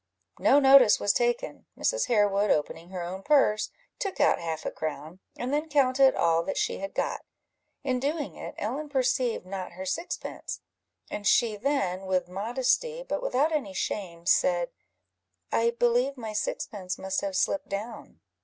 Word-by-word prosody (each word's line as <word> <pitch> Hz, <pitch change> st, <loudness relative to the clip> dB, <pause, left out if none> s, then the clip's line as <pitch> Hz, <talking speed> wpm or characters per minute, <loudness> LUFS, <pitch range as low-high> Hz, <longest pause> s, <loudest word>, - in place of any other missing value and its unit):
No 285 Hz, -, +5 dB
notice 270 Hz, -5 st, +7 dB
was 205 Hz, -, +2 dB
taken. 240 Hz, +1 st, -1 dB
Mrs. -, -, 0 dB
Harewood 205 Hz, -3 st, +2 dB
opening 160 Hz, +3 st, -1 dB
her 185 Hz, -2 st, -5 dB
own 185 Hz, +2 st, -5 dB
purse, 270 Hz, -5 st, +3 dB, 0.3 s
took 395 Hz, -2 st, -3 dB
out -, -, +4 dB
half 160 Hz, -2 st, -4 dB
a -, -, -2 dB
crown, 155 Hz, +3 st, -5 dB, 0.2 s
and 250 Hz, +3 st, -3 dB
then 300 Hz, +2 st, -1 dB
counted 270 Hz, -2 st, +4 dB
all 165 Hz, 0 st, +3 dB
that -, -, -3 dB
she -, -, -1 dB
had 195 Hz, 0 st, -6 dB
got. -, -, -1 dB, 0.6 s
In 255 Hz, -2 st, 0 dB
doing 290 Hz, +2 st, -2 dB
it, -, -, -8 dB
Ellen 275 Hz, +8 st, -3 dB
perceived 255 Hz, -6 st, 0 dB
not 185 Hz, -2 st, -6 dB
her 185 Hz, +2 st, -7 dB
sixpence, 190 Hz, -, -4 dB, 0.5 s
and 205 Hz, -1 st, -3 dB
she 230 Hz, -1 st, +4 dB
then, 195 Hz, -6 st, -1 dB
with 185 Hz, -1 st, 0 dB
modesty, 250 Hz, -, -1 dB
but -, -, -2 dB
without 310 Hz, -, +1 dB
any 265 Hz, -12 st, -2 dB
shame, 170 Hz, -4 st, -4 dB
said 175 Hz, -1 st, +2 dB, 0.8 s
"I 230 Hz, +1 st, +3 dB
believe 240 Hz, +3 st, +1 dB
my 220 Hz, -3 st, -6 dB
sixpence 195 Hz, -3 st, -3 dB
must 190 Hz, 0 st, -2 dB
have 195 Hz, -1 st, -3 dB
slipped 295 Hz, -, 0 dB
down." 215 Hz, +3 st, -6 dB
215 Hz, 160 wpm, -27 LUFS, 190-270 Hz, 0.8 s, notice